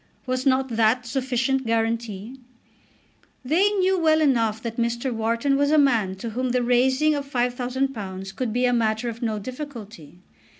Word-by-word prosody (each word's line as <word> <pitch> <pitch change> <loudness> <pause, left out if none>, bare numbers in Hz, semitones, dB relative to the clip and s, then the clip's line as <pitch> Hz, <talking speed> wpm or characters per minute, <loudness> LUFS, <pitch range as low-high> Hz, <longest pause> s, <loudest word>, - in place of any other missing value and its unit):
Was 255 +1 -1
not 265 0 +2
that 230 +2 +2
sufficient 265 +1 -1
guarantee? 225 0 -2 1.1
They 345 +10 +3
knew 380 -1 +2
well 315 -1 +3
enough 230 -8 +2
that 230 -1 -5
Mr. 235 +2 -1
Wharton 230 +5 0
was 285 0 +2
a 310 - +4
man 230 -10 +2
to 225 +4 -6
whom 255 +3 -2
the 250 -1 +1
raising 260 +5 +3
of 280 -1 -4
£5000 245 -6 -2
could 250 -1 -2
be 245 +3 +1
a 245 - +2
matter 225 0 0
of 230 0 -8
no 220 -3 -1
difficulty. 215 - -8
245 Hz, 160 wpm, -24 LUFS, 225-270 Hz, 1.1 s, a